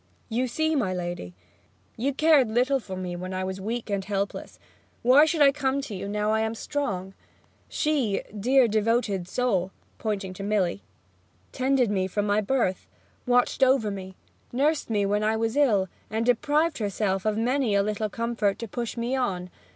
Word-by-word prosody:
You 245 +3 0
see, 315 +6 0
my 195 -10 0
lady, 175 - -5 0.6
you 265 +5 0
cared 290 -4 +4
little 255 +4 +2
for 190 -6 -7
me 180 -1 -4
when 185 +1 -5
I 185 - -2
was 190 0 -4
weak 230 +4 -3
and 200 -1 -1
helpless; 200 0 -3 0.5
why 260 +5 +7
should 315 -1 +3
I 275 - +7
come 275 -1 -1
to 270 - -7
you 195 +1 -5
now 210 +1 0
I 220 - +2
am 220 0 -1
strong? 195 -9 -3 0.6
She, 275 -10 0
dear 250 +5 +4
devoted 215 -4 0
soul 195 -6 0 0.3
[pointing 200 -4 -3
to 195 - -7
Milly], 200 -2 0 0.7
tended 260 -3 +1
me 190 -2 0
from 205 +2 -1
my 205 +1 +2
birth, 210 -4 0 0.4
watched 245 +2 +2
over 260 -5 +4
me, 190 -1 -7 0.4
nursed 290 +4 +1
me 205 -3 +1
when 205 +1 +1
I 220 +1 +1
was 225 +2 -1
ill, 220 -10 +3 0.2
and 220 +2 -1
deprived 295 +6 +2
herself 200 -2 -1
of 215 -1 0
many 245 -1 +1
a 200 - +3
little 215 +1 -2
comfort 230 -2 -1
to 230 - -6
push 235 +2 -4
me 235 +3 -1
on. 185 -9 -2
220 Hz, 175 wpm, -26 LUFS, 195-255 Hz, 0.7 s, why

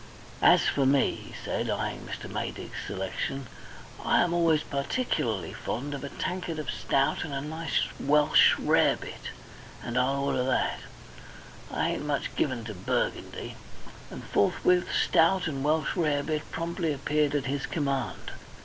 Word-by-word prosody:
"As - - +6
for 135 -2 +2
me," 140 0 +3
he - - -10
said, - - -1
eyeing - - -3
Mr. - - -6
Maydig's - - -5
selection, 125 +8 -3 0.6
"I - - +4
am 175 -1 0
always 165 -3 +3
particularly 140 - -1
fond 140 +5 -4
of 140 -1 -5
a 140 - -4
tankard 180 -1 -3
of 155 -2 -3
stout 135 0 +1
and 160 - -6
a 140 - -2
nice 160 +3 -1 0.2
Welsh 150 +2 +5
rarebit, - - +1 0.5
and 120 - -1
I'll 135 +2 +1
order 135 -2 +1
that. 130 - 0 0.9
I - - 0
ain't - - -3
much 145 -2 -2
given 130 -5 0
to 110 -1 -6
Burgundy," 90 -1 -3 0.5
and - - -8
forthwith 180 - +2
stout 180 +3 +3
and 140 -5 -2
Welsh 155 +1 +1
rarebit 150 -2 0
promptly 165 -1 -1
appeared 150 +1 +1
at 145 - 0
his 135 +1 -2
command. 135 - -2
145 Hz, 145 wpm, -28 LUFS, 135-160 Hz, 0.9 s, As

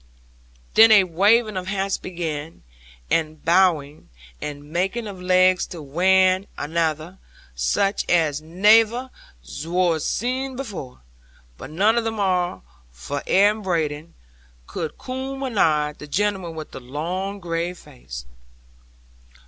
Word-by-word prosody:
'Then 225 +1 +8
a 205 -3 +8
waving 205 +5 +3
of 185 0 -4
hats 195 0 -1
began, 165 -3 -5 0.5
and 155 -2 +1
a 155 - -25
bowing, 165 - +2 0.3
and 145 -1 -6
making 190 +7 -1
of 195 -3 -8
legs 185 0 +3
to 175 - -8
wan 185 +5 +2
anather, 160 +2 -2 0.3
sich 60 - 0
as 155 -4 +2
nayver 220 +9 +3 0.5
wor 170 -1 +1
zeed 255 - -2
afore; 190 - -7 0.5
but 130 - -10
none 210 +9 +2
of 225 - -2
'em 220 -1 -3
arl, 180 - 0 0.3
for 140 - -5
air 200 +2 +5
and 215 +1 -6
brading, 160 -3 -2 0.5
cud 160 - -5
coom 265 +1 -5
anaigh 155 - +1
the 150 - -9
gentleman 190 0 -1
with 155 -1 -8
the - - -8
long 175 +10 -4
grave 170 0 -3
face. 60 - -10
180 Hz, 125 wpm, -22 LUFS, 155-205 Hz, 0.5 s, Then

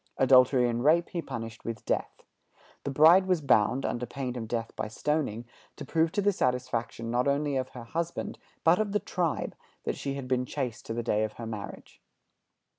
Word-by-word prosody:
Adultery 130 -1 +5
and 120 0 -1
rape 165 +4 +4
he 170 - -3
punished 115 -5 -7
with 115 -1 -5
death. - - -2 0.6
The - - -1
bride 160 +7 +6
was 180 -3 +3
bound, 130 -2 +3
under 120 0 -2
pain 130 -3 -4
of 115 -2 -4
death 115 0 -3
by - - -3
stoning, 120 -1 -1 0.3
to 145 - -8
prove 160 +3 +1
to 205 - 0
the 205 - +4
satisfaction 125 -4 -1
not 125 +2 +1
only 140 0 +1
of 130 0 -1
her 120 - -7
husband, 165 +8 -4 0.2
but 165 +4 +5
of 210 -2 -1
the 210 - +3
tribe, 175 -6 -2 0.3
that - - -2
she 140 -1 -3
had 135 -2 -5
been 125 0 0
chaste 125 -7 -4
to 115 - -3
the 120 - -2
day 110 -2 +1
of 110 0 -3
her 115 - -7
marriage. 110 -3 -8
130 Hz, 195 wpm, -29 LUFS, 115-155 Hz, 0.6 s, bride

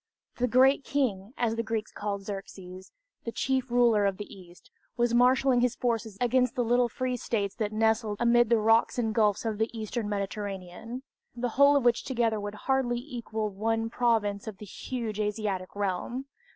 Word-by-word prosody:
"The 250 - +1
Great 265 +3 +4
King," 240 -6 -1
as 230 -2 0
the - - +1
Greeks 225 -1 -3
called 200 -1 -4
Xerxes, 190 -2 -8 0.3
the 230 - -4
chief 260 +1 -1
ruler 235 -4 +4
of 195 -1 -2
the 210 - -6
East, 180 -2 -16 0.3
was 240 0 +2
marshaling 250 +1 +4
his 245 -1 +1
forces 230 -4 -2
against 250 0 +2
the 245 - +1
little 240 +1 +2
free 255 +1 -2
states 205 -4 -2
that 215 -2 -1
nestled 220 -1 +1
amid 240 -1 +4
the 235 - +5
rocks 225 +3 +3
and 225 -3 0
gulfs 210 -1 +2
of 215 -2 -2
the 220 - +1
Eastern 215 0 -3
Mediterranean 200 +3 -5 0.3
the 245 0 -2
whole 280 +4 +5
of 275 -3 +2
which 240 0 +3
together 230 -4 0
would 205 0 -5
hardly 265 -3 +1
equal 235 -5 -4
one 225 +3 -1
province 220 -5 +1
of 215 -3 -6
the 210 - -9
huge 220 +1 -5
Asiatic 205 -3 -2
realm! 205 +6 -2
225 Hz, 180 wpm, -28 LUFS, 205-245 Hz, 0.3 s, the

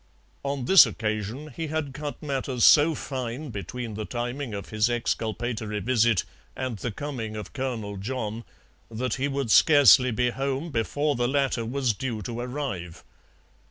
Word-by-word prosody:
On 140 -2 -3
this 190 +7 +8
occasion 110 +7 -4
he 165 - -3
had 150 -3 -3
cut 150 +2 -6
matters 135 -4 -2
so 155 +1 +6
fine 130 +1 -5
between 115 +3 -5
the 110 +1 -4
timing 120 +3 -4
of 100 - -7
his 110 +2 +1
exculpatory 115 -2 -2
visit 115 -2 +2 0.3
and 130 -4 -3
the 120 - -3
coming 115 -3 -5
of 105 -3 -7
Colonel 115 -7 -4
John, 115 +1 -4 0.5
that 115 +1 -2
he 140 - +2
would 135 -4 -2
scarcely 140 -4 +7
be 125 +1 +1
home 135 +5 -3
before 145 +5 0
the 120 0 +1
latter 135 -3 0
was 125 0 0
due 110 -1 -4
to 115 +4 -5
arrive. 120 - -5
125 Hz, 155 wpm, -26 LUFS, 110-140 Hz, 0.5 s, this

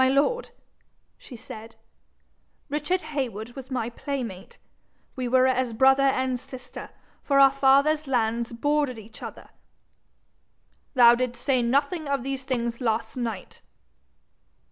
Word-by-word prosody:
'My 260 - +4
lord,' 385 - +1 0.7
she 255 - -11
said, 225 -1 -10 0.9
'Richard 300 +6 -1
Heywood 235 -5 -3
was 260 0 -10
my 240 -3 -2
playmate. 235 -8 -6 0.6
We 255 -1 -3
were 255 +1 +4
as 255 -2 +1
brother 265 +4 +5
and 260 -2 +1
sister, 250 0 -10 0.3
for 275 -1 +2
our 275 -1 +8
fathers'lands 270 -4 +2
bordered 290 +1 0
each 220 +1 -12
other.' - - -9 1.5
'Thou 240 -2 +8
didst 245 0 -3
say 265 -3 +3
nothing 280 +6 0
of 275 -3 0
these 270 0 -4
things 235 -2 -2
last 225 -1 -1
night?' 230 -6 -5
255 Hz, 120 wpm, -25 LUFS, 235-275 Hz, 1.5 s, our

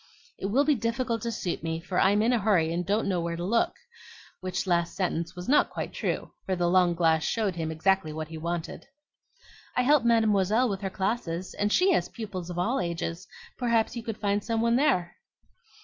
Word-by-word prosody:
It 195 - -2
will 265 +8 +2
be 300 - +4
difficult 230 -1 -1
to 235 - -2
suit 185 -5 -3
me, 160 0 -2
for 180 +2 -2
I'm 205 +2 +4
in 240 +3 +3
a 240 - +2
hurry 185 -6 +2
and 175 +1 -1
don't 205 +5 0
know 180 -3 0
where 170 0 -2
to 170 - -5
look," 230 +5 +1 0.6
which 185 +1 -3
last 170 -2 0
sentence 175 -3 -2
was 180 0 -7
not 290 +4 +4
quite - - -5
true, - - -3 0.2
for 190 - +1
the 175 -1 +1
long 175 -1 +3
glass 160 -2 +2
showed 215 -4 0
him 165 -2 -3
exactly 175 0 +1
what 155 0 -5
he 160 - -7
wanted. 170 0 -4 0.9
"I 250 - +4
help 290 +1 +4
Mademoiselle 220 0 +3
with 195 -1 -3
her 195 - -2
classes, 190 -3 -2
and 205 0 -1
she 370 - +4
has 175 - +1
pupils 200 -6 -6
of 175 - -6
all 225 +9 +1
ages; 170 +1 -3 0.3
perhaps 235 -2 +1
you 235 - -4
could 225 -2 -5
find 205 0 0
some 225 -1 -1
one 235 +1 +2
there." 185 - +1
195 Hz, 210 wpm, -27 LUFS, 175-230 Hz, 0.9 s, be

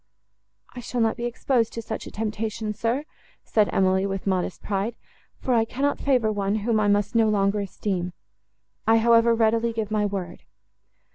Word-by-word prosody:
—"I - - -6
shall 245 0 -4
not 225 -1 +2
be 240 - -4
exposed 240 -1 0
to 230 - -4
such 220 - -5
a - - -9
temptation, 215 0 -3
sir," 230 +6 -1 0.4
said 210 -2 +2
Emily, 190 0 +2
with 195 -1 -4
modest 185 -2 -1
pride, 205 +3 -2 0.4
"for 255 - -1
I 230 -2 +4
cannot 270 +5 -1
favour 250 -6 +2
one, 200 -1 -1
whom 230 -2 +2
I 210 - +2
must 205 0 +2
no 225 -2 +4
longer 200 0 +2
esteem. 185 -2 -3 0.7
I, 225 0 +6
however, 230 0 +5
readily 230 +1 +2
give 220 -2 -3
my 210 -1 +1
word." 190 -3 -5
220 Hz, 170 wpm, -25 LUFS, 200-230 Hz, 0.7 s, I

